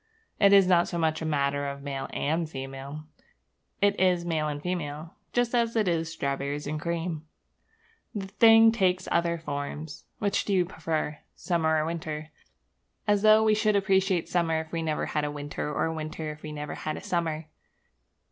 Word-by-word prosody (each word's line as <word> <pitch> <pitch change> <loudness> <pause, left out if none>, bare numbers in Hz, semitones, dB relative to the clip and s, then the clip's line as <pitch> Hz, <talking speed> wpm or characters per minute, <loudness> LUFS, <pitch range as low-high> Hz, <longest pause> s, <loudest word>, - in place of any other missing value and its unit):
It 200 -1 +6
is 200 -1 +7
not 175 -2 +4
so 175 - -3
much 160 -1 0
a - - -3
matter 140 -1 0
of 140 0 -6
male 135 -1 -4
and 160 +2 -1
female: 135 +1 -7 0.8
it 205 0 +3
is 180 -2 +3
maleandfemale, 155 0 -2 0.2
just 245 0 +1
as 235 -1 +1
it 215 -3 +2
is 165 -2 0
strawberriesandcream. 150 +4 -2 0.9
The 200 -2 -3
thing 225 +3 +6
takes 185 -4 +1
other 170 0 +2
forms. 145 0 -6
Which 200 -1 0
do 205 - -1
you 180 -2 +3
prefer 160 -3 -3 0.2
summer 160 -3 +1
or 155 - +1
winter? 155 -2 -4 0.8
As 205 -1 +3
though 215 +1 +6
we 215 -1 +4
should 215 0 +2
appreciate 190 -3 +2
summer 165 -2 +1
if 160 0 -7
we 165 - -2
never 155 -2 -1
had 150 - -1
a 150 - -1
winter, 145 0 -4
or 160 +2 0
winter 155 0 -4
if 150 0 -11
we 155 - -7
never 150 0 -5
had 155 - -4
a - - -9
summer! 165 -5 -1
160 Hz, 165 wpm, -27 LUFS, 150-185 Hz, 0.9 s, is